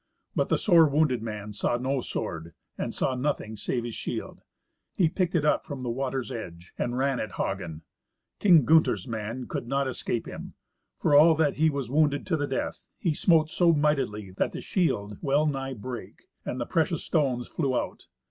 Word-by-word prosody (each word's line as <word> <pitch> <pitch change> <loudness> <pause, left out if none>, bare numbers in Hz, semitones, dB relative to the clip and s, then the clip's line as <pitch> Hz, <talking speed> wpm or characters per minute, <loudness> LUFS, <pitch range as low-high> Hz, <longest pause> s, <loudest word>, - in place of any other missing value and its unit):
But - - +1
the - - +3
sore 170 -5 +6
wounded 140 -5 +2
man 105 -2 -5
saw 110 +3 0
no 130 +2 -1
sword, 80 -7 -5 0.2
and - - -3
had 130 -1 0
nothing 125 -5 -2
save 120 +3 -2
his 120 -1 -5
shield. - - -5 0.5
He 175 - +4
picked 180 +1 -1
it 155 -3 +2
up 150 - +3
from 140 -3 -6
the 120 - -1
water's 135 +1 -2
edge 85 -7 -8
and 120 +1 -2
ran 135 -1 +1
at 110 - -4
Hagen. 85 -5 -3 0.6
King 170 - +6
Gunther's 160 0 +4
man 115 +2 -4
could 120 - -4
not 135 +1 0
escape 120 -2 -2
him. - - -8 0.4
For - - +1
all 160 +2 +7
that 155 -2 +1
he 160 +1 +4
was 140 -5 -3
wounded 145 -1 +2
to 185 - +1
the 145 -2 -1
death, 130 - -3
he 170 - 0
smote 160 0 +3
so 170 -2 +4
mightily 135 -10 0
that 95 - -1
the - - -5
shield 105 - -1
well 145 +2 +2
nigh 135 -3 -2
brake, 120 +2 -8 0.2
and 125 - -4
the 120 - -1
precious 165 +2 0
stones 130 -7 0
flew 135 -6 -1
out. - - -6
135 Hz, 190 wpm, -27 LUFS, 115-155 Hz, 0.6 s, all